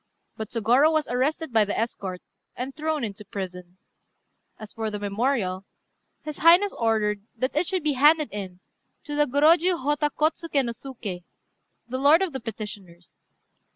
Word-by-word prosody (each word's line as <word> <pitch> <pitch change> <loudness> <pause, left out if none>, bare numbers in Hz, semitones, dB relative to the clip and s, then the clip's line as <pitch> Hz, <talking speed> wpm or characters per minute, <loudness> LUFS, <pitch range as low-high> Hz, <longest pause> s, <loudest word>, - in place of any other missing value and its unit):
But 220 -1 -6
Sôgorô 245 +7 +3
was 310 -2 0
arrested 265 +4 -1
by 220 -1 +5
the 205 - -3
escort, 195 -5 -3 0.3
and 260 +2 -5
thrown 310 -2 -2
into 210 -1 -5
prison. 180 -2 -7 0.8
As 215 -1 -10
for 220 -1 -3
the 210 - -4
memorial, 205 -2 -1 0.6
his 305 -1 -7
Highness 350 +5 +6
ordered 215 -3 0 0.2
that 255 +4 -1
it 320 +3 +1
should 375 -4 -1
be 300 -1 +1
handed 300 +3 +4
in 190 -3 -7 0.4
to 295 - -6
the 295 0 +3
Gorôjiu 330 +6 +4
Hotta 295 +2 0
Kôtsuké 305 -1 0
no 235 - -2
Suké, 230 -7 -7 0.6
the 255 +2 -3
lord 300 +6 +5
of 360 -6 -3
the 265 - -3
petitioners. 205 -7 -8
250 Hz, 155 wpm, -25 LUFS, 210-300 Hz, 0.8 s, Highness